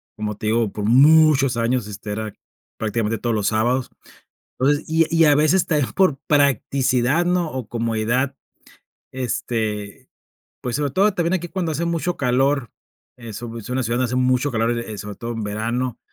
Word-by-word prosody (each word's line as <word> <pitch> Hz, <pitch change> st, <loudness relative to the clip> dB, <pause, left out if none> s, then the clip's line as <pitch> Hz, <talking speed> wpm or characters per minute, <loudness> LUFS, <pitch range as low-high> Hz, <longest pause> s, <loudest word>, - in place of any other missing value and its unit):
como 105 Hz, -1 st, -4 dB
te -, -, -7 dB
digo, 115 Hz, -1 st, +1 dB
por 105 Hz, -1 st, -4 dB
muchos 140 Hz, +1 st, +5 dB
años, 115 Hz, -1 st, 0 dB
este, 105 Hz, 0 st, -6 dB
era 110 Hz, -1 st, -5 dB, 0.4 s
prácticamente 110 Hz, 0 st, -1 dB
todos 115 Hz, +1 st, -1 dB
los 105 Hz, -2 st, 0 dB
sábados. 120 Hz, +4 st, 0 dB, 0.7 s
Entonces, 145 Hz, +3 st, +1 dB
y 160 Hz, 0 st, +3 dB
y 165 Hz, -1 st, +5 dB
a 145 Hz, -, +6 dB
veces 155 Hz, +5 st, +3 dB
también 150 Hz, -5 st, 0 dB
por 185 Hz, -7 st, +3 dB
practicidad, 140 Hz, +1 st, +2 dB
¿no? 175 Hz, -2 st, +1 dB
O 130 Hz, -5 st, -5 dB
comodidad, 115 Hz, +3 st, -1 dB, 0.8 s
este, 110 Hz, -5 st, -3 dB, 0.5 s
pues 125 Hz, -1 st, -2 dB
sobre 145 Hz, -2 st, -1 dB
todo 200 Hz, +7 st, +3 dB
también 175 Hz, -1 st, 0 dB
aquí 175 Hz, -2 st, -2 dB
cuando 175 Hz, -4 st, -2 dB
hace 165 Hz, +4 st, -2 dB
mucho 170 Hz, +1 st, -1 dB
calor, 135 Hz, -1 st, +1 dB, 0.5 s
es 115 Hz, -3 st, -8 dB
u 115 Hz, -1 st, -7 dB
es 115 Hz, +1 st, -9 dB
una 130 Hz, 0 st, -1 dB
ciudad 115 Hz, +2 st, -1 dB
donde 130 Hz, -, +2 dB
hace 125 Hz, +1 st, -3 dB
mucho 130 Hz, +2 st, +1 dB
calor, 115 Hz, +1 st, 0 dB
eh, 110 Hz, -3 st, -6 dB
sobre 105 Hz, 0 st, -7 dB
todo 115 Hz, +3 st, -6 dB
en 115 Hz, -, -4 dB
verano, 115 Hz, +4 st, -2 dB
125 Hz, 175 wpm, -21 LUFS, 115-145 Hz, 0.8 s, a